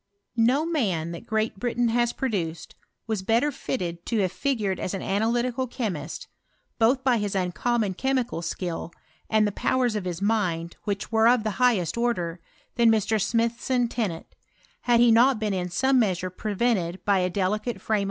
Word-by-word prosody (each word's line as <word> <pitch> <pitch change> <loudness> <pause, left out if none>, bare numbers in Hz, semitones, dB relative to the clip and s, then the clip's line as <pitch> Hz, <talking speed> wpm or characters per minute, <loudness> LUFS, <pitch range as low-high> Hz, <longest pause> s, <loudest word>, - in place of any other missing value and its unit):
No 250 +6 +3
man 195 - -1
that 170 +7 -9
Great 220 -2 -1
Britain 240 0 0
has 240 +1 +2
produced 175 -12 -3 0.3
was 220 -4 -2
bet 225 +6 +2
ter 295 - +1
fitted 170 -10 -4
to 230 - 0
have 185 -2 0
figured 215 -6 -1
as 185 - -3
an 195 - -5
analytical 240 +5 0
chemiat. 190 - -4 0.5
both 250 +4 +3
by 250 -3 +3
his 205 -1 -2
uncommon 195 +3 0
chemical 255 -4 -1
skill, 170 0 -4 0.4
and 215 -1 +3
ihe 205 - -3
powers 250 -1 +1
of 205 -3 -3
his 175 -2 -3
mind, 185 -6 0
which 200 +1 -3
were 220 0 +4
of 240 -2 +4
the 215 0 -3
highest 235 -5 +2
order, 180 -8 -1 0.4
than 235 -1 +5
Mr. 220 -1 +2
Smithson 235 +3 +1
Tennant, 210 -9 -3 0.6
had 240 -1 +4
he 240 -1 +6
not 240 +3 +5
been 215 -2 -1
'm 180 -1 -1
Bome 265 +8 +2
measure 185 -4 0
prevented 195 -3 -1
by 200 -2 +3
a 180 0 +1
delicate 205 +6 -1
frame. 215 -1 0
220 Hz, 170 wpm, -25 LUFS, 185-240 Hz, 0.6 s, he